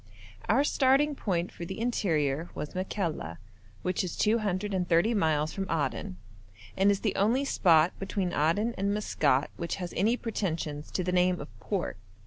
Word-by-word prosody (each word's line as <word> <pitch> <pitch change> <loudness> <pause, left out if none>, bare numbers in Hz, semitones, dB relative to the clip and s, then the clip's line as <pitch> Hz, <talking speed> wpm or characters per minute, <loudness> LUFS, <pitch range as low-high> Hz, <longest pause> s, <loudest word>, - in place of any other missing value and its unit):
Our 255 +6 +4
starting 285 +1 +3
point 180 -9 -2
for - - -8
the 190 +4 -6
interior 165 - 0
was 150 - -5
Makalla, 180 - -3 0.5
which 180 0 0
is 180 - -4
230 200 -2 +1
miles 160 -6 +1
from 195 -1 -4
Aden, 145 - -2 0.6
and 195 +1 +4
is 200 -1 +2
the 210 - 0
only 235 +8 +2
spot 170 - +4
between 195 -2 -2
Aden 185 +10 +1
and 200 +1 +1
Maskat 145 -9 +1
which 170 - -3
has 180 -2 -6
any 225 +6 +2
pretensions 165 -10 -3
to 185 - 0
the 180 - -1
name 180 0 +2
of 145 - -7
port. 190 - -3
185 Hz, 155 wpm, -29 LUFS, 165-210 Hz, 0.6 s, Our